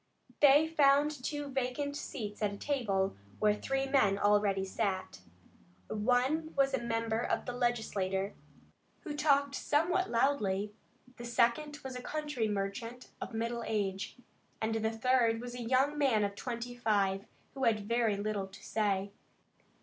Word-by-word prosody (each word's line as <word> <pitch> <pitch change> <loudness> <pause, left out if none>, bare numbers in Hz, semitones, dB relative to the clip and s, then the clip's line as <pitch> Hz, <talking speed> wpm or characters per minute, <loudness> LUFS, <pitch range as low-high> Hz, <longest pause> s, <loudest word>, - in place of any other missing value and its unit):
They 290 +2 +7
found 290 -2 +4
two 290 +1 -3
vacant 270 +2 -2
seats 215 -8 -6
at 210 -1 +1
a - - -7
table, 200 -8 0 0.2
where 210 -1 +3
three 270 +5 -1
men 265 -8 +3
already 205 -1 +2
sat. 190 - -2 0.7
One 255 +9 +1
was 275 -1 +3
a 265 - 0
member 230 -1 -1
of - - -1
the 245 - -4
Legislature, 205 -6 -1 0.7
who 300 -4 -5
talked 280 -2 +3
somewhat 345 +7 +1
loudly; 210 -6 +1 0.4
the 240 - -7
second 240 +5 +1
was 265 -1 -6
a 250 - -5
country 295 -5 -2
merchant 210 +5 -4
of 230 - -5
middle 230 +1 -2
age, 195 -2 -2 0.4
and 220 0 -1
the 220 0 0
third 230 0 +2
was 245 0 -6
a 245 - -6
young 265 +5 +2
man 250 -7 +3
of 200 0 -1
twenty 240 +2 -5
five, 200 -4 +1 0.3
who 265 -1 -1
had 220 -2 +3
very 230 -3 +2
little 205 -1 -2
to 195 +1 -14
say. 200 -2 0
235 Hz, 150 wpm, -32 LUFS, 210-270 Hz, 0.7 s, They